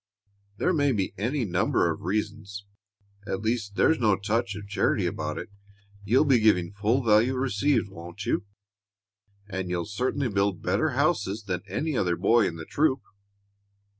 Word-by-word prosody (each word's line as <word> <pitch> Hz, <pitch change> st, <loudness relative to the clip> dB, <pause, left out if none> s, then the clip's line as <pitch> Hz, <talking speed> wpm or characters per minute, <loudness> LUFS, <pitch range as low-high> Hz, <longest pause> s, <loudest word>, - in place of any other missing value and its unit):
There 185 Hz, -, +1 dB
may 145 Hz, -3 st, +2 dB
be 100 Hz, -4 st, -1 dB
any 120 Hz, +5 st, -1 dB
number 90 Hz, -2 st, +1 dB
of 80 Hz, -, -6 dB
reasons. 100 Hz, +1 st, -3 dB, 0.6 s
At 95 Hz, +2 st, -3 dB
least 110 Hz, -3 st, -2 dB
there's 160 Hz, -, +3 dB
no 105 Hz, -4 st, +3 dB
touch 105 Hz, +2 st, -1 dB
of 105 Hz, -1 st, -8 dB
charity 100 Hz, -, +1 dB
about -, -, -3 dB
it. -, -, -6 dB, 0.5 s
You'll 120 Hz, +9 st, +3 dB
be 135 Hz, -4 st, +4 dB
giving 95 Hz, -5 st, +2 dB
full 110 Hz, +6 st, +1 dB
value 115 Hz, +3 st, +4 dB
received, 130 Hz, -1 st, +1 dB
won't 90 Hz, +2 st, -9 dB
you? 120 Hz, -, 0 dB, 1.0 s
And 95 Hz, -2 st, -4 dB
you 90 Hz, -1 st, -1 dB
certainly 125 Hz, +6 st, -1 dB
build 100 Hz, -3 st, 0 dB
better -, -, +1 dB
houses 105 Hz, +3 st, +1 dB
than 90 Hz, -3 st, -3 dB
any 155 Hz, -1 st, -2 dB
other 90 Hz, -6 st, +1 dB
boy 105 Hz, +5 st, +3 dB
in 85 Hz, -, -4 dB
the 80 Hz, -1 st, -8 dB
troop." 140 Hz, -, +1 dB
105 Hz, 160 wpm, -26 LUFS, 95-120 Hz, 1.0 s, be